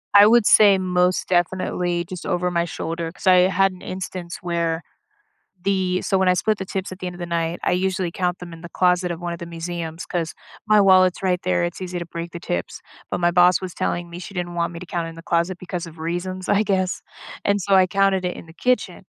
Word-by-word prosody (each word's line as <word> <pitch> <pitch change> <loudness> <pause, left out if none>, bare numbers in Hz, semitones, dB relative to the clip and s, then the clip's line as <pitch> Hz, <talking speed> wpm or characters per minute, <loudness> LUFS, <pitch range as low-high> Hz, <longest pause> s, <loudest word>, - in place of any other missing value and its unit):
I 205 +1 +9
would 235 0 +5
say 205 -2 +7
most 180 -1 +1
definitely 175 -1 0
just 180 0 -8
over 180 0 0
my 170 -1 +1
shoulder 165 0 -4
'cause - - -13
I 180 0 +7
had 195 +1 +3
an 185 - -13
instance 185 -2 -6
where 170 -1 -1 0.8
the 185 -2 +1
so 195 - +1
when 190 -1 +3
I 180 - +5
split 215 +3 +1
the 190 - -4
tips 190 0 -4
at 185 - -10
the 185 - -4
end 180 - -8
of - - -14
the 175 - -3
night, 170 0 -1
I - - +2
usually 185 0 0
count 180 -1 -1
them 175 -1 -9
in 165 - -10
the 170 - -8
closet 180 0 +2
of 170 -1 -4
one 175 -1 -3
of 170 - -7
the 170 - -6
museums 170 0 -5
'cause 165 -2 -2 0.3
my 215 -1 +5
wallet's 185 -2 +5
right 180 -2 +1
there; 180 -1 +1
it's 175 +1 -4
easy 180 -1 -4
to 170 - -5
break 170 0 -6
the 170 - -7
tips. 85 - -4 0.3
But - - -1
my 175 0 +3
boss 180 +1 +5
was 185 -2 -6
telling 175 0 -2
me 170 +1 -8
she 200 - -9
didn't 175 -1 -3
want 170 0 -1
me 170 - -7
to 180 - -9
count 170 -1 -3
in 165 - -10
the 165 - -10
closet 170 +2 0
because 180 -1 -5
of 165 -1 -12
reasons, 175 +3 -4
I 205 +1 +3
guess, 190 -3 0 0.4
and 200 0 +2
so 195 +1 +1
I 185 -1 +6
counted 195 0 +2
it 180 - -2
in - - -10
the 160 - -14
kitchen. 250 +8 -1
180 Hz, 245 wpm, -22 LUFS, 170-185 Hz, 0.8 s, I